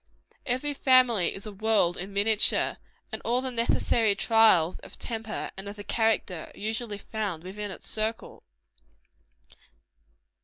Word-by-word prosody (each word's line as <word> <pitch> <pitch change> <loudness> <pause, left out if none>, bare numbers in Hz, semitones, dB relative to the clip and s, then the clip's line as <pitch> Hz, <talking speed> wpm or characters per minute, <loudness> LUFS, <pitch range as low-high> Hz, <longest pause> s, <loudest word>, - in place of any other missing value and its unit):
Each 270 +3 -2
family 250 -8 +4
is 195 - -8
a 215 - -6
world 205 -4 +2
in 190 +3 -6
miniature; 205 +2 +3 0.3
and - - -4
all 240 +2 +1
the 260 0 -3
necessary 230 -2 +1
trials 215 -8 +4
of - - -11
the - - -11
temper 225 -2 -4
and 195 +1 -7
of 205 - -8
the 205 - -9
character, 220 -7 0
are - - -16
usually 215 0 -3
found 200 -6 -4
within 205 +3 -6
its - - -8
circle. 220 +1 -3
215 Hz, 145 wpm, -27 LUFS, 200-230 Hz, 0.3 s, family